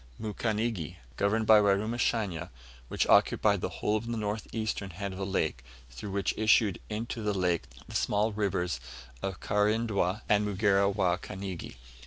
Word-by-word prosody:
Mukanigi, 110 Hz, -4 st, -2 dB, 0.2 s
governed 110 Hz, -, +1 dB
by 110 Hz, 0 st, +8 dB
Warumashanya, 100 Hz, -3 st, 0 dB, 0.4 s
which -, -, 0 dB
occupied -, -, +4 dB
the -, -, -1 dB
whole 105 Hz, +1 st, 0 dB
of 110 Hz, +2 st, -6 dB
the 120 Hz, -1 st, -2 dB
north 105 Hz, 0 st, -3 dB
eastern 110 Hz, -3 st, -2 dB
head 95 Hz, +3 st, -5 dB
of 95 Hz, -, -7 dB
the 95 Hz, -, -2 dB
lake, 80 Hz, -9 st, -1 dB, 0.3 s
through -, -, -7 dB
which 100 Hz, 0 st, 0 dB
issued 110 Hz, -3 st, +3 dB
into 115 Hz, +2 st, -4 dB
the 105 Hz, -1 st, -1 dB
lake 90 Hz, -3 st, +1 dB, 0.2 s
the -, -, -10 dB
small 105 Hz, +2 st, +1 dB
rivers 90 Hz, -8 st, -1 dB, 0.4 s
of 95 Hz, -2 st, -3 dB
Karindwa 105 Hz, -1 st, +1 dB
and 105 Hz, 0 st, +4 dB
Mugera 100 Hz, -1 st, +3 dB
wa 95 Hz, -3 st, +1 dB
Kanigi. 95 Hz, -6 st, -6 dB
105 Hz, 155 wpm, -30 LUFS, 95-110 Hz, 0.4 s, by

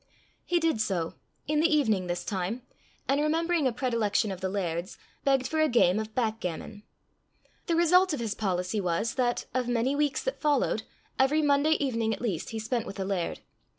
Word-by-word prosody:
He 350 Hz, -, +2 dB
did 320 Hz, -9 st, +1 dB
so, 180 Hz, -6 st, -1 dB, 0.3 s
in 300 Hz, +1 st, +1 dB
the 330 Hz, +2 st, +3 dB
evening 220 Hz, -, +2 dB
this 175 Hz, 0 st, -3 dB
time, 200 Hz, +5 st, -3 dB, 0.4 s
and 280 Hz, +2 st, +2 dB
remembering 325 Hz, 0 st, +1 dB
a -, -, +1 dB
predilection 225 Hz, -4 st, 0 dB
of 190 Hz, -1 st, -6 dB
the 190 Hz, -, -1 dB
laird's, 180 Hz, -1 st, -3 dB, 0.3 s
begged 270 Hz, -2 st, +2 dB
for 315 Hz, +3 st, -1 dB
a 310 Hz, -, +3 dB
game 215 Hz, -5 st, +4 dB
of 220 Hz, 0 st, -6 dB
backgammon. 215 Hz, -3 st, -3 dB, 0.9 s
The 335 Hz, -, +2 dB
result 360 Hz, +3 st, +5 dB
of 295 Hz, -, -2 dB
his 225 Hz, -3 st, -2 dB
policy 190 Hz, 0 st, -1 dB
was, 180 Hz, +5 st, 0 dB
that, 245 Hz, -2 st, 0 dB
of 255 Hz, -1 st, 0 dB
many 245 Hz, +3 st, +1 dB
weeks 295 Hz, 0 st, 0 dB
that -, -, -3 dB
followed, 290 Hz, -7 st, +2 dB, 0.4 s
every 295 Hz, +4 st, +3 dB
Monday 290 Hz, +2 st, +4 dB
evening 230 Hz, -7 st, 0 dB
at -, -, -15 dB
least 205 Hz, -10 st, -2 dB
he 225 Hz, -, -5 dB
spent 225 Hz, +2 st, -2 dB
with 195 Hz, -, -7 dB
the 190 Hz, -, -3 dB
laird. 190 Hz, -3 st, -2 dB
235 Hz, 185 wpm, -28 LUFS, 200-290 Hz, 0.9 s, result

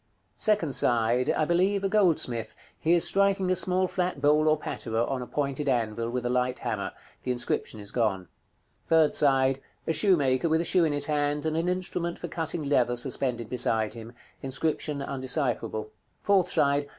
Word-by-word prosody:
Second 205 Hz, -10 st, +1 dB
side. 120 Hz, +1 st, +2 dB
I 155 Hz, -, +1 dB
believe, 190 Hz, +4 st, +1 dB
a -, -, +2 dB
goldsmith; 155 Hz, -, 0 dB, 0.2 s
he 165 Hz, +2 st, +2 dB
is 170 Hz, -, +4 dB
striking 195 Hz, -1 st, +2 dB
a -, -, +3 dB
small 185 Hz, +1 st, +2 dB
flat 180 Hz, -4 st, -2 dB
bowl 150 Hz, +2 st, +3 dB
or 155 Hz, 0 st, +4 dB
patera, 115 Hz, -5 st, -2 dB
on 130 Hz, 0 st, -3 dB
a 125 Hz, -, -6 dB
pointed 140 Hz, 0 st, -2 dB
anvil, 115 Hz, -2 st, -1 dB
with 125 Hz, 0 st, -3 dB
a -, -, 0 dB
light 125 Hz, 0 st, 0 dB
hammer. -, -, -4 dB, 0.3 s
The -, -, -6 dB
inscription 120 Hz, -2 st, -2 dB
is 100 Hz, -1 st, -7 dB
gone. 100 Hz, -6 st, -1 dB, 0.6 s
Third 160 Hz, -2 st, +3 dB
side. 135 Hz, -2 st, +2 dB, 0.3 s
A 165 Hz, -, 0 dB
shoemaker 160 Hz, -7 st, +2 dB
with 160 Hz, +1 st, +2 dB
a -, -, -3 dB
shoe 175 Hz, 0 st, +3 dB
in 155 Hz, -, 0 dB
his 145 Hz, 0 st, +3 dB
hand, 145 Hz, 0 st, -1 dB
and 160 Hz, 0 st, -1 dB
an 165 Hz, +2 st, 0 dB
instrument 180 Hz, -1 st, -2 dB
for 175 Hz, -, -6 dB
cutting 165 Hz, -1 st, -3 dB
leather 125 Hz, -4 st, +1 dB
suspended 120 Hz, -2 st, -1 dB
beside 115 Hz, -3 st, 0 dB
him. 115 Hz, 0 st, -10 dB, 0.3 s
Inscription 140 Hz, +1 st, -2 dB
undecipherable. 130 Hz, -5 st, -2 dB, 0.3 s
_Fourth 190 Hz, -3 st, +3 dB
side. 145 Hz, -3 st, +1 dB
145 Hz, 175 wpm, -27 LUFS, 125-170 Hz, 0.6 s, is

